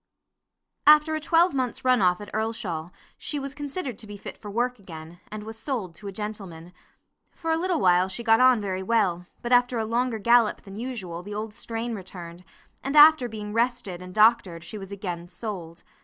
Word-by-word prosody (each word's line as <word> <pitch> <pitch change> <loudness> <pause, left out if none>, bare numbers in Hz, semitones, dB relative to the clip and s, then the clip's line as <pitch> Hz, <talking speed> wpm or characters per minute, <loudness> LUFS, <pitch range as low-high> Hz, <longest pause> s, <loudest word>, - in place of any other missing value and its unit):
After 305 +1 +7
a 310 - 0
twelvemonth's 310 -7 +1
run 255 -2 +4
off 180 -1 +3
at 205 - -10
Earlshall, 215 -7 -3 0.3
she 295 - -3
was 275 0 -5
considered 285 - -5
to 220 - -8
be 205 0 -8
fit - - -8
for 210 - -10
work 245 +3 -1
again, 165 -2 -11
and 215 0 -7
was 220 +1 -8
sold 225 - -3
to 200 +5 -10
a - - -4
gentleman. 190 -5 -7 0.6
For 330 -1 -4
a - - +3
little 350 0 0
while 180 0 +4
she 195 +5 -4
got 225 -1 +5
on 255 -2 +6
very 190 -2 -3
well, 190 -4 +1 0.2
but 240 - -3
after 245 0 +4
a 220 - 0
longer 235 +1 0
gallop 235 0 +3
than 195 -1 -11
usual 210 -8 -5
the 205 +3 -7
old 215 0 -4
strain 230 +1 -4
returned, 180 -3 -9 0.4
and 275 +2 -2
after 295 -4 +8
being 210 -1 -6
rested 230 -6 -1
and 185 0 -9
doctored 210 -5 +3
she 205 +6 -7
was 195 0 -9
again 180 -4 -5
sold. 175 -3 -7
215 Hz, 195 wpm, -26 LUFS, 185-245 Hz, 0.6 s, after